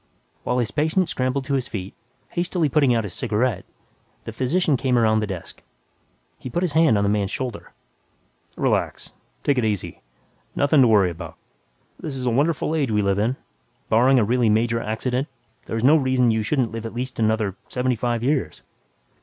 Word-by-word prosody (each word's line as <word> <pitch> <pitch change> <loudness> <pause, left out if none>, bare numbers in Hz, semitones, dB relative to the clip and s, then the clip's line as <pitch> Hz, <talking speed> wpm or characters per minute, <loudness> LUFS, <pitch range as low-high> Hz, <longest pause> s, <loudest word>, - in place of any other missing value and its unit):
While 125 - -1
his 115 -4 0
patient 160 - +1
scrambled 130 +1 -1
to 140 - -2
his 130 -2 0
feet, 95 -5 -6 0.4
hastily 175 -2 -1
putting 140 -2 +3
out 115 - +1
his 100 -4 -6
cigarette, 110 -3 -1 0.6
the - - -6
physician 140 +6 +1
came 130 -1 +1
around 110 -2 +3
the 105 - -2
desk. 95 -4 -7 0.8
He 130 - -7
put 175 +8 -1
his 180 - 0
hand 160 -8 +4
on 100 - +1
the - - +1
man's 100 -2 0
shoulder, 125 -4 -5 0.9
"Relax, - - -1 0.3
take 140 -3 +2
it - - 0
easy 100 -6 -2 0.5
nothing 140 0 +4
to 125 - +6
worry 100 -5 +4
about. 85 -1 -9 0.6
This 150 -4 -5
is 130 -1 -4
a 125 - +2
wonderful 150 +5 +1
age 145 -5 0
we 105 -1 +1
live 100 0 +1
in. 115 +5 +1 0.5
Barring 125 +4 +4
a 120 - +4
really 120 +1 +2
major 115 +2 +2
accident, 125 +5 -2 0.4
there's 115 0 -3
no 145 +5 +6
reason 130 -4 +2
why - - +3
you 110 - 0
shouldn't 125 +2 0
live 115 0 -5
at 115 - -10
least 125 +1 -4
another 110 -3 +1
seventy 125 0 0
five 120 0 -2
years. 140 +1 -1
125 Hz, 185 wpm, -23 LUFS, 110-135 Hz, 0.9 s, to